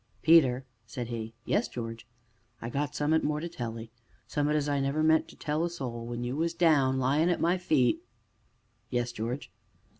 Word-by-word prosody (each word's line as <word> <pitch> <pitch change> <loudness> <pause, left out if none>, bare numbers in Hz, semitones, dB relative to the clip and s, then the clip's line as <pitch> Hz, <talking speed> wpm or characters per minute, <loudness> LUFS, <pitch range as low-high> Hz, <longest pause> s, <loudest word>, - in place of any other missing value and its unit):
"Peter!" 135 -6 +5 0.2
said 120 -2 -5
he. 115 -1 -5
"Yes, - - +1
George?" 115 -1 -6 0.5
"I 115 +2 -5
got 145 +1 -2
summ'at 155 +2 +2
more 150 0 0
to 170 - -4
tell 115 -7 -5
'ee 115 0 -9 0.3
summ'at 150 +1 0
as 150 -1 +1
I 145 -1 +1
never 140 +3 0
meant 160 0 +4
to - - -14
tell 150 0 -2
to 165 - +2
a - - -1
soul; 120 -8 -5
when 120 0 -4
you 125 +2 -2
was 165 +2 -1
down 145 -6 +4
lyin' 140 +6 +2
at 175 - +1
my 175 +2 +2
feet 140 -8 +2 0.5
" - - -41 0.3
"Yes, 120 0 -1
George?" 120 +4 -4
140 Hz, 200 wpm, -29 LUFS, 120-155 Hz, 0.5 s, Peter